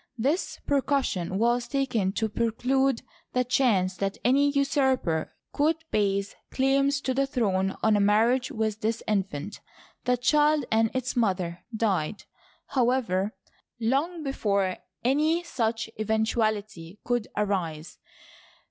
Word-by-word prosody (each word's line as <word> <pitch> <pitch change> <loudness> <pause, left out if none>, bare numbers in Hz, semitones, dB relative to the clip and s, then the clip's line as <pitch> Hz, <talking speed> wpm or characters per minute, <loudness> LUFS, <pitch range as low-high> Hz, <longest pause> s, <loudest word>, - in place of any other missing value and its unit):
This 280 +10 0
precaution 265 - 0
was 235 +2 +1
taken 250 -9 0
to 220 +1 0
preclude 245 +4 0 0.3
the 250 - +2
chance 215 -8 +2
that 195 0 -2
any 280 +3 +4
usurper 265 - +1 0.2
could 310 +3 +2 0.2
base 200 -1 0 0.2
claims 275 +1 +2
to 260 - -1
the 275 +1 +1
throne 195 -7 0
on 220 -1 +4
a - - +3
mar 210 +3 +4
riage 255 0 0
with 220 -1 -2
this 225 +1 -1
infant. 195 -3 -2 0.5
The 250 0 +2
child 295 +2 +3
and 225 0 +3
its 255 0 -2
mother 185 -7 0
died, 205 -4 0 0.5
however, 235 -6 +1 0.4
long 285 +9 0
before 200 -9 0 0.3
any 305 +7 +2
such 230 -8 -1
eventuality 215 -4 -1
could 240 -2 -1
arise. 175 -7 -2
225 Hz, 120 wpm, -27 LUFS, 200-270 Hz, 0.5 s, any